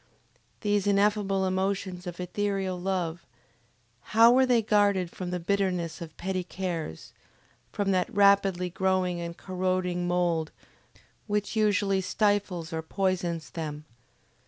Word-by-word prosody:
These 205 Hz, -1 st, +1 dB
ineffable 200 Hz, -1 st, +2 dB
emotions 190 Hz, -1 st, -2 dB
of 175 Hz, 0 st, -6 dB
ethereal 190 Hz, 0 st, -2 dB
love, 175 Hz, -3 st, -2 dB, 0.9 s
how 230 Hz, +1 st, +9 dB
were 260 Hz, +1 st, +4 dB
they 240 Hz, -3 st, +3 dB
guarded 200 Hz, -4 st, +2 dB
from 180 Hz, -1 st, -6 dB
the 180 Hz, 0 st, -2 dB
bitterness 180 Hz, -2 st, -1 dB
of 160 Hz, -2 st, -9 dB
petty 185 Hz, 0 st, -2 dB
cares, 175 Hz, -, -5 dB, 0.6 s
from 200 Hz, -1 st, 0 dB
that 185 Hz, -1 st, +1 dB
rapidly 195 Hz, -3 st, +3 dB
growing 185 Hz, -1 st, 0 dB
and 170 Hz, 0 st, -6 dB
corroding 185 Hz, -1 st, -1 dB
mould 175 Hz, -3 st, +1 dB, 0.8 s
which 210 Hz, +1 st, -1 dB
usually 205 Hz, -2 st, +2 dB
stifles 190 Hz, -4 st, 0 dB
or 160 Hz, -, -2 dB
poisons 175 Hz, -2 st, -2 dB
them? 150 Hz, -2 st, -5 dB
185 Hz, 120 wpm, -28 LUFS, 175-200 Hz, 0.9 s, how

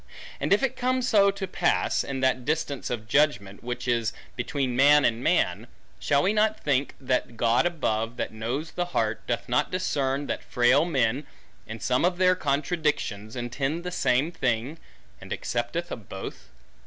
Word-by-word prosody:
And -, -, -2 dB
if 205 Hz, +6 st, +4 dB
it 265 Hz, -, 0 dB
come 255 Hz, +1 st, 0 dB
so 205 Hz, -5 st, +5 dB
to 195 Hz, 0 st, -3 dB
pass, -, -, +1 dB
in 135 Hz, -1 st, -4 dB
that 130 Hz, -1 st, +2 dB
distance 145 Hz, -2 st, -2 dB
of 110 Hz, -3 st, -4 dB
judgment, 110 Hz, -8 st, +1 dB
which 125 Hz, +1 st, -4 dB
is 115 Hz, -2 st, +1 dB, 0.2 s
between 125 Hz, 0 st, -2 dB
man 145 Hz, +3 st, +6 dB
and 115 Hz, +2 st, +1 dB
man, 90 Hz, -, +1 dB, 0.3 s
shall 140 Hz, 0 st, +2 dB
we 200 Hz, -, +2 dB
not 215 Hz, 0 st, +2 dB
think 140 Hz, -1 st, 0 dB
that 125 Hz, -3 st, -1 dB
God 120 Hz, +8 st, +3 dB
above, 115 Hz, -9 st, -2 dB
that -, -, -3 dB
knows 120 Hz, +9 st, -3 dB
the 175 Hz, -, -2 dB
heart, 110 Hz, -1 st, 0 dB
doth 120 Hz, -, -2 dB
not 125 Hz, -, +1 dB
discern 140 Hz, -6 st, -1 dB
that -, -, -3 dB
frail 125 Hz, +5 st, +3 dB
men, 135 Hz, -3 st, 0 dB, 0.4 s
in 115 Hz, +1 st, -7 dB
some 125 Hz, +5 st, +1 dB
of 175 Hz, 0 st, +2 dB
their 185 Hz, 0 st, +5 dB
contradictions, 140 Hz, -, -1 dB
intend 135 Hz, +7 st, -2 dB
the 180 Hz, -, -4 dB
same 135 Hz, 0 st, +1 dB
thing; 125 Hz, +1 st, -1 dB, 0.4 s
and -, -, -11 dB
accepteth 120 Hz, +9 st, -3 dB
of 110 Hz, -5 st, -7 dB
both? 95 Hz, -, -8 dB
135 Hz, 170 wpm, -26 LUFS, 120-165 Hz, 0.4 s, man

